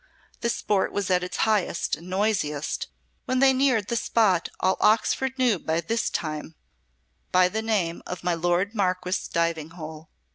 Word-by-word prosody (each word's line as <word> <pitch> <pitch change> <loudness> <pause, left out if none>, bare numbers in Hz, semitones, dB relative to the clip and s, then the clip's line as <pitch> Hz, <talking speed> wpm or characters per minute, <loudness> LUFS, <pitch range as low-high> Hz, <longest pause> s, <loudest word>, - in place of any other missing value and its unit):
The 235 - -1
sport 205 -3 0
was 200 -2 -2
at 180 0 +3
its 180 - -5
highest 210 -5 +1
and 175 +2 -12
noisiest 185 -7 -1 0.4
when 255 -1 0
they 265 0 +5
neared 255 -6 +2
the 235 - -1
spot 210 -7 +2
all 190 0 +2
Oxford 260 +4 +2
knew 245 -7 +2
by 160 +1 -1
this 225 +7 -1
time 155 0 -4 0.8
by 185 0 +5
the 220 +3 -2
name 200 -7 -1
of 180 -1 -6
"my 175 0 +1
Lord 175 +4 0
Marquess's 185 -3 -1
diving 165 -2 -1
hole." 155 -1 -8
185 Hz, 160 wpm, -25 LUFS, 170-220 Hz, 0.8 s, they